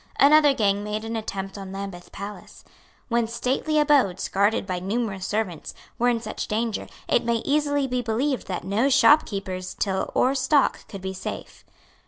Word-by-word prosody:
Another 295 +1 +7
gang 205 -2 +1
made 210 +1 -3
an 225 +1 -4
attempt 195 -2 -5
on 195 -1 -7
Lambeth 195 -2 -7
Palace. 200 +1 -9 0.4
When 235 -1 +1
stately 255 +6 -1
abodes, 280 - +3
guarded 200 +2 +2
by 185 -2 -3
numerous 195 -1 -2
servants, 210 -6 -3 0.2
were 245 +1 +3
in 235 -1 +1
such 215 -1 -5
danger, 225 0 -2 0.2
it - - +2
may 235 -1 0
easily 285 -1 +1
be 250 -1 -1
believed 245 +4 -1
that 180 -2 -4
no 205 +9 +1
shopkeeper's 200 -10 +3
till 190 -2 -1
or 260 - +3
stock 275 +1 +2
could 195 -2 -9
be 190 0 -3
safe. 185 - -7
220 Hz, 165 wpm, -24 LUFS, 195-255 Hz, 0.4 s, Another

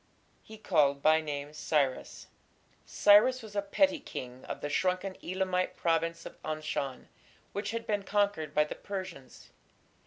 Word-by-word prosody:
He 220 - -12
called 145 -9 +2
by 155 +1 +5
name 145 -1 -5
Cyrus." 145 -4 -1 0.6
Cyrus 230 +5 +5
was 210 -2 -11
a 200 - +2
petty 290 +9 +2
king 125 - -8
of - - -6
the - - -2
shrunken 185 +5 0
Elamite 185 0 -1
province 165 0 0
of - - -10
Anshan, 155 -4 -4 0.5
which 205 +1 -3
had 230 0 -3
been 205 -1 0
conquered 200 -7 0
by 150 - +5
the 150 - -5
Persians. 185 -9 -8
180 Hz, 145 wpm, -30 LUFS, 150-205 Hz, 0.6 s, by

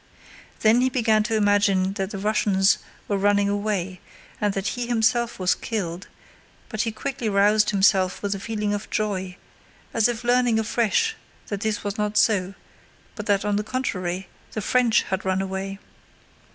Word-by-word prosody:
Then 225 +3 +5
he 260 - +3
began 225 -4 +2
to 225 +1 -1
imagine 205 -2 +2
that 195 -1 -3
the 205 - -6
Russians 200 -1 +2 0.3
were 200 -1 0
running 205 0 +3
away 200 -3 -2 0.4
and 210 -1 +2
that 195 0 -1
he 245 -1 -4
himself 235 0 +1
was 185 -1 +2
killed, 185 -5 -4 0.6
but 215 -2 -2
he 230 -2 -1
quickly 240 +1 -3
roused 205 +1 +4
himself 190 -2 +2
with 200 0 0
a 195 - -5
feeling 210 -1 -2
of 205 +1 -4
joy, 190 -3 -2 0.6
as 225 0 +3
if 240 -1 -3
learning 245 -1 +3
afresh 235 - +1 0.3
that 205 -1 -3
this 220 -2 -1
was 205 +1 -4
not 210 0 -1
so 195 -4 +2 0.6
but 210 - -7
that 200 -1 +2
on 205 -1 +1
the 210 - -1
contrary 190 -7 -3 0.3
the 215 - -3
French 245 0 +3
had 190 -1 -3
run 190 0 0
away. 195 0 -4
205 Hz, 165 wpm, -24 LUFS, 195-225 Hz, 0.6 s, Then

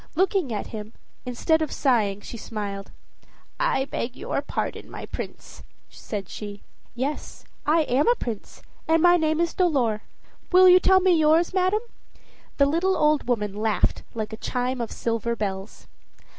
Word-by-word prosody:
Looking 375 - +1
at 210 - -2
him, 215 0 -7 0.3
instead 320 +6 +1
of 310 - -1
sighing, 210 -7 +1
she 235 - -8
smiled. 205 -3 -5 0.7
"I - - +1
beg 250 -2 -4
your - - -2
pardon, - - -4
my - - -7
Prince," - - -8 0.3
said 200 -4 -6
she. 205 0 -8 0.3
"Yes, 270 +5 -4 0.2
I 320 +2 +4
am 280 - +1
a 480 - +5
prince, 230 - -6 0.2
and 325 0 +3
my 350 0 +7
name 315 -1 +1
is 340 -1 +1
Dolor; 260 - +1 0.5
will 370 0 +8
you 365 0 +8
tell 380 0 +5
me 370 -1 +4
yours, 320 +3 +3
madam?" 375 +3 +2 0.8
The 280 - +5
little 340 +6 +1
old 300 -3 +2
woman 210 -5 0
laughed 215 0 0
like 220 -1 -4
a - - -5
chime 250 +1 -2
of 230 - -4
silver 230 0 -1
bells. 195 -2 -5
265 Hz, 155 wpm, -25 LUFS, 220-335 Hz, 0.8 s, will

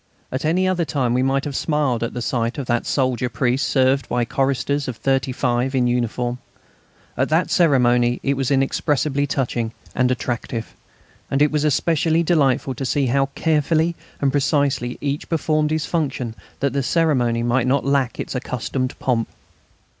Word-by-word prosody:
At 130 +4 -3
any 180 +4 +2
other 185 -2 +1
time 130 -6 0
we 125 - +2
might 135 +1 +1
have 145 -2 -4
smiled 145 -7 0
at 115 +1 -3
the 120 - -3
sight 115 0 -1
of 140 - -3
that 120 0 -1
soldier 130 -2 0
priest 130 +1 0
served 130 0 +2
by 120 -1 +1
choristers 140 +2 0
of 125 -3 -4
thirty 135 0 0
five 125 +1 0
in 125 -2 +2
uniform; 120 0 -1 0.8
at - - 0
that 160 +3 +1
ceremony 125 -7 +3
it 140 - +1
was 135 -2 -1
inexpressibly 140 +1 +1
touching 120 -5 -2 0.2
and 125 0 +2
attractive, 120 -2 -3 0.6
and 135 - 0
it 150 0 +4
was 150 -1 0
especially 160 +2 +2
delightful 140 -6 +2
to 130 - -6
see 135 +2 +1
how 135 0 +2
carefully 160 +1 +1 0.2
and 140 -1 +1
precisely 140 -3 0
each 140 0 -3
performed 155 -2 +1
his 155 0 -1
function 135 -8 -2 0.3
that 140 -1 +1
the 140 - +1
ceremony 125 -6 +1
might 120 +1 +1
not 135 +2 +1
lack 140 -3 +1
its - - -4
accustomed 130 0 -3
pomp. 120 -3 0
135 Hz, 170 wpm, -21 LUFS, 125-145 Hz, 0.8 s, it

